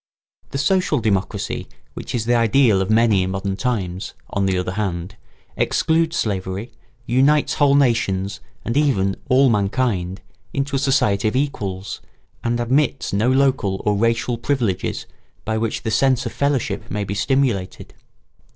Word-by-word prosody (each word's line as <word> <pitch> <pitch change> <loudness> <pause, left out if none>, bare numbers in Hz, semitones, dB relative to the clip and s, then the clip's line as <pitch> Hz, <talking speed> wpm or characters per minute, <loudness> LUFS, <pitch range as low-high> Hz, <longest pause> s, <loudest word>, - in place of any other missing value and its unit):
] - - -39
The - - -4
social 160 +2 +2
democracy 100 -4 -1 0.3
which - - -6
is 115 -2 -1
the 120 - +2
ideal 115 -3 +4
of 95 - -2
many 110 -3 +4
in 95 - -1
modern 95 0 -2
times, 95 -4 -3 0.2
on 100 -1 0
the 95 -1 +1
other 90 0 -2
hand, 95 -1 -3 0.4
excludes 165 +1 +1
slavery, 95 +2 -2 0.3
unites 135 +5 +3
whole 145 -2 +3
nations 105 -7 +1 0.3
and 115 - -2
even 105 -10 +2
all 135 +1 +5
mankind 100 -3 0 0.3
into 140 0 -1
a - - +1
society 120 -7 +2
of 110 - -1
equals, 100 -9 -3 0.4
and 120 0 0
admits 135 +2 0
no 105 +5 +2
local 130 -8 +2
or 105 -1 +2
racial 115 +2 0
privileges 115 -8 -1 0.4
by 110 0 -1
which 115 0 -2
the 110 - -2
sense 130 +2 +2
of - - -3
fellowship 140 -5 -1
may 105 -1 -2
be 100 0 -4
stimulated. 110 -3 -1
115 Hz, 150 wpm, -21 LUFS, 100-135 Hz, 0.4 s, all